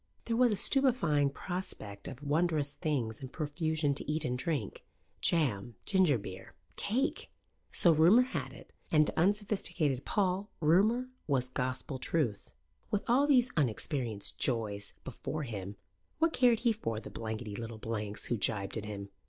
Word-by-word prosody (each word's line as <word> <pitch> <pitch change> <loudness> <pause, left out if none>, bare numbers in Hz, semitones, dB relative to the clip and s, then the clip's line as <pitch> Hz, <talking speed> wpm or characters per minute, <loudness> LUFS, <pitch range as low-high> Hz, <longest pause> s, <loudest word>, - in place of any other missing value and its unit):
There 230 - 0
was 245 0 +4
a - - +2
stupefying 195 - +3
prospect 140 - -6
of 130 +3 -8
wondrous 150 -1 +1
things 130 -8 -2
in 130 - -6
profusion 155 0 -1
to 145 - -3
eat 155 0 -1
and 125 - 0
drink 135 - -3 0.4
jam, 120 - +1
ginger 185 -9 +3
beer, 95 -3 -9 0.2
cake! 260 +9 -1 0.4
So 170 - +6
rumour 175 +11 +6
had 255 - -4
it; - - -14 0.2
and 155 -1 +5
to - - -2
unsophisticated 190 - +1
Paul 195 0 0
rumour 210 +11 +3 0.2
was 130 -4 +1
gospel 130 +1 -3
truth. 125 -9 -1 0.3
With 205 - 0
all 265 +5 +4
these 255 -3 +4
unexperienced 120 -5 -1
joys 105 -5 -1
before 155 0 -5
him, 100 -5 -6 0.4
what 330 +1 +2
cared 245 -3 +4
he 235 -2 +3
for 115 - -3
the - - -10
blankety 110 -1 -5
little 115 0 -6
blanks 105 -2 -4
who 120 - 0
gibed 100 0 0
at 105 - -4
him? 100 -1 -6
150 Hz, 150 wpm, -32 LUFS, 115-190 Hz, 0.4 s, So